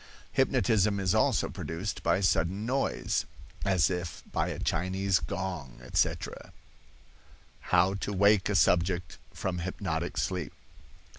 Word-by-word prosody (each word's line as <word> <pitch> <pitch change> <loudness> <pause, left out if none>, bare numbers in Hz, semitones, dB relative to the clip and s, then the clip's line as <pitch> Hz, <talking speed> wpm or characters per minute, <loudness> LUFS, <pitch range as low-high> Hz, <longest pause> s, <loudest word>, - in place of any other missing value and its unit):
Hypnotism 105 -3 +2
is 95 -2 +1
also - - +2
produced 90 +6 -5
by 95 - +2
sudden 95 +2 +1
noise, 135 +3 0 0.4
as 95 -3 +3
if 90 -3 -4
by - - 0
a - - -4
Chinese 95 +2 0
gong, 80 -10 -5
etc. 65 - -1 1.2
HOW 90 +1 +4
TO 100 +1 -3
WAKE 100 0 +4
A 105 - 0
SUBJECT 90 -3 +2
FROM 90 -2 -3
HYPNOTIC 90 +2 -3
SLEEP. - - -2
95 Hz, 120 wpm, -29 LUFS, 90-100 Hz, 1.2 s, HOW